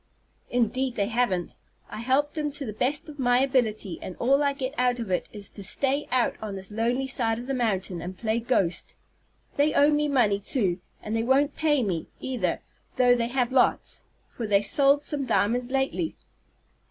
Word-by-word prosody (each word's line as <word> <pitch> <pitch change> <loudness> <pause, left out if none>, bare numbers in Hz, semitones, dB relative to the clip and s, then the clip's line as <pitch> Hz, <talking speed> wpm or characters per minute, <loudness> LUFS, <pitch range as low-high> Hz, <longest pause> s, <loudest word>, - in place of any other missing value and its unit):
"Indeed 245 +2 0
they 200 0 0
haven't. 220 -7 -1 0.3
I - - -8
helped 270 +6 +1
'em 300 -2 -1
to 290 -1 -2
the 215 - -5
best 285 - -1
of 295 -2 -10
my 245 -1 +3
ability, 220 -9 0
and 185 - -7
all 275 +4 +2
I 285 -1 +2
get 270 -1 -4
out 250 -2 +1
of 230 -5 -5
it 180 - -1
is 205 -2 -5
to 200 - -9
stay 275 +8 0
out 250 -1 +2
on 210 -2 -5
this 190 +1 -8
lonely 235 +5 0
side 235 -4 0
of 240 - -6
the 270 - -2
mountain, 195 -8 -1
and 180 +2 -7
play 220 0 0
ghost. 225 -7 -1 0.6
They 290 +1 +2
owe 290 +1 +5
me 295 0 +2
money, 235 -8 +2
too, 195 -4 0 0.2
and 215 +1 -3
they 225 - +1
won't 275 +4 +2
pay 295 -4 +2
me, 175 -6 -2
either, 235 -10 -2 0.3
though 250 -1 +5
they 235 -1 0
have 245 0 0
lots, 260 - +2 0.3
for 230 - -4
they 200 -1 +3
sold 280 +6 +4
some 280 -3 -2
diamonds 240 +2 +1
lately." 270 +5 -1
245 Hz, 190 wpm, -26 LUFS, 215-275 Hz, 0.6 s, owe